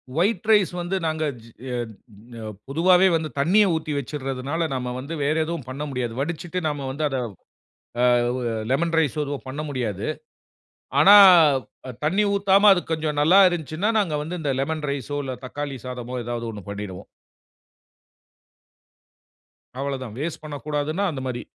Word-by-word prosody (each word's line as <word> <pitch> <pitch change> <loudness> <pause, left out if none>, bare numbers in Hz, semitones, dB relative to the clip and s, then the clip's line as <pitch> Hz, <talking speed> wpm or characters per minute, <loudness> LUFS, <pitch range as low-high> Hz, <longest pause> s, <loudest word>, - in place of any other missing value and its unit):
White 190 +4 +1
rice 205 -4 +5
வந்து 175 +2 -2
நாங்க 155 0 -1 0.2
G 115 - -15 0.9
அ - - -7 0.2
பொதுவாவே 180 +6 +4
வந்து 160 -1 -2
தண்ணீய 190 +9 +4
ஊத்தி 160 -1 -3
வச்சிடுறதுனால, 135 +2 -4
நாம 125 -1 -3
வந்து 140 +5 -6
வேற 150 +2 +1
எதுவும் 165 -5 -5
பண்ண 135 +3 -5
முடியாது. 125 -4 -3
வடிச்சிட்டு 170 +4 -3
நாம 145 -2 -3
வந்து 145 +4 -4
அத 135 -2 -2 0.9
அ - - +5 0.3
ஒ - - -3
எ - - -2 0.2
லெமன் 165 +5 +1
ரைஸ் 155 -2 0
எதுவும் 140 -1 -5
பண்ண 140 +4 -5
முடியாது. 120 -8 -3 0.9
ஆனா, 195 +7 +8 0.7
அ - - -4
தண்ணீ 190 +7 +2
ஊத்தாம 200 +1 +5
அது 180 -2 +1
கொஞ்சம் 155 -2 -2
நல்லா 175 +7 +6
இருந்துச்சுன்னா, 175 +4 -2
நாங்க 180 -7 0
வந்து 170 +4 -5
இந்த 145 -3 -1
லெமன் 155 +2 -2
ரைஸ்ஸோ 140 +1 -3
இல்ல 130 - -4
தக்காளி 140 +1 -5
சாதமோ 125 0 -6
ஏதாவது 120 -1 -4
1 105 -2 -8
பண்ணிடுவோம். 100 -3 -7 2.7
அவ்வளதான், 130 -5 -4
வேஸ்ட் 155 +1 -4
பண்ணக்கூடாதுன்னா 150 +3 -3
அந்தமாரி. 130 -3 -4
150 Hz, 145 wpm, -23 LUFS, 130-170 Hz, 2.7 s, ஆனா